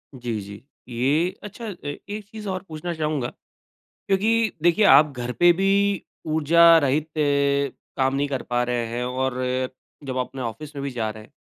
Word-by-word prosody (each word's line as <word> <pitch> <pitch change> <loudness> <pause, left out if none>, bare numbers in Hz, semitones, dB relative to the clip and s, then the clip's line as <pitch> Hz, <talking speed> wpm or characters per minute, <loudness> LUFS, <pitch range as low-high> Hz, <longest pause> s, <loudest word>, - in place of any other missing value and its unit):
जी, 120 -3 -3
जी। 100 +4 -10 0.3
ये 140 +9 +1
अच्छा 220 +3 -8
अ, 200 - -5 0.3
एक 210 +1 -5
चीज़ 215 -1 -8
और 185 0 -3
पूछना 160 +2 -5
चाहूँगा 150 -5 -1 0.8
क्योंकि 220 +3 +2
देखिए 175 +5 +4
आप 145 +2 +7
घर 125 0 -3
पे 175 +4 +5
भी 195 +1 +2 0.2
ऊर्जा 165 +2 +6
रहित 145 +2 +1
अ, 140 -1 +1 0.2
काम 135 0 +1
नहीं 140 +1 0
कर 135 -3 -3
पा 120 0 0
रहे 120 -1 -1
हैं 120 +2 -3
और 130 +1 -1 0.7
जब 130 -1 -4
अपने 130 +1 -3
ऑफ़िस 140 +6 -6
में 140 - -4
भी 140 - -3
जा 115 -3 -2
रहे 110 0 -9
हैं। 105 - -19
145 Hz, 180 wpm, -24 LUFS, 125-175 Hz, 0.8 s, आप